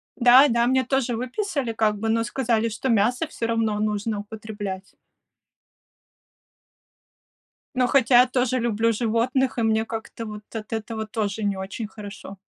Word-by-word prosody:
Да-да, 245 -1 +6
мне 260 0 +3
тоже 260 -2 0
выписали, 255 - -2
как 215 -1 +1
бы, 225 - -2
но 230 +1 +2
сказали, 230 -2 0
что 225 +5 -4
мясо 240 +7 +2
всё 235 - -4
равно 225 -2 0
нужно 210 0 -1
употреблять. 205 -2 -7 2.8
Но, 250 -1 +2
хотя 245 -2 +5
я 255 - +3
тоже 255 0 0
люблю 230 -1 +1
животных, 245 +4 0
и 235 - +1
мне 220 0 +2
как-то 225 0 -6
вот 210 -1 -8
от 220 0 -5
этого 220 0 -4
тоже 215 -1 -3
не 200 -1 0
очень 195 +3 -5
хорошо. 205 -2 -10
225 Hz, 145 wpm, -24 LUFS, 215-245 Hz, 2.8 s, Да-да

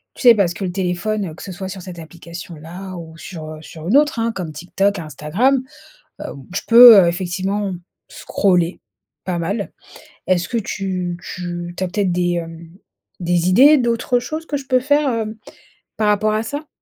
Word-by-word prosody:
tu - - -11
sais, 240 -2 +8
parce 185 -4 +1
que 195 - -6
le 180 - -2
téléphone, 185 +1 -2
que - - -13
ce 195 - -7
soit 190 +1 -6
sur 190 -1 -7
cette 180 -1 -9
application-là 170 +2 -9
ou 160 -1 -10
sur, 160 -2 -8
heu, 155 - -8
sur 160 +1 -10
une 240 - +5
autre, 295 -5 +2
hein, 230 0 0
comme 180 -6 -5
TikTok, 185 +5 -1
Instagram, 170 - 0 0.6
heu, - - -5 0.3
je - - 0
peux 230 -5 +10
effectivement 185 +3 -2 0.3
scroller 180 -3 0 0.5
pas 180 -2 -2
mal. 200 +5 -3 0.6
Est-ce 180 -2 +1
que 235 - -1
tu 185 -4 -3
tu 175 -1 -6
tu - - -2
as 185 - 0
peut-être 195 -1 0
des, 175 0 +1
hem, 165 -1 -6 0.5
des 175 0 +1
idées 280 +10 +7
d'autres 240 0 +1
choses 310 +6 -5
que 290 - -2
je 275 -1 -10
peux 255 -1 +3
faire, 290 +1 +2
hem, 220 -2 -2 0.6
par 215 - +1
rapport 210 +1 +2
à 215 +1 0
ça? 290 +6 -6
190 Hz, 180 wpm, -19 LUFS, 175-220 Hz, 0.6 s, peux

